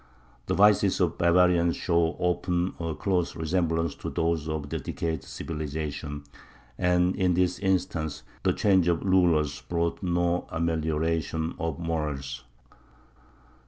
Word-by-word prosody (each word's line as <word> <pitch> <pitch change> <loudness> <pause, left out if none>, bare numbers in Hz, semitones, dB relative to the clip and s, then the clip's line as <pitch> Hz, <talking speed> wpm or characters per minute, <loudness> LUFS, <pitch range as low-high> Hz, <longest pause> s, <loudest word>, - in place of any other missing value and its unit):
The - - 0
vices 100 -1 +4
of 85 -3 0
barbarians 85 0 +4
show 85 -1 +1
often 90 0 0
a 80 -2 -3
close 90 -4 -1
resemblance 80 -1 0
to - - -5
those 80 -1 -1
of 75 -2 -3
decayed 80 +2 -3
civilization, 75 -1 -5 0.5
and 90 +4 +2
in 90 -2 +2
this 90 0 +1
instance 90 -5 -1 0.2
the - - +2
change 95 -4 +3
of 85 -2 +1
rulers 85 -7 +2
brought 85 -1 -2
no 85 -1 0
amelioration 80 0 -1
of 80 -3 -2
morals. 75 -6 -3
85 Hz, 120 wpm, -27 LUFS, 80-90 Hz, 0.5 s, vices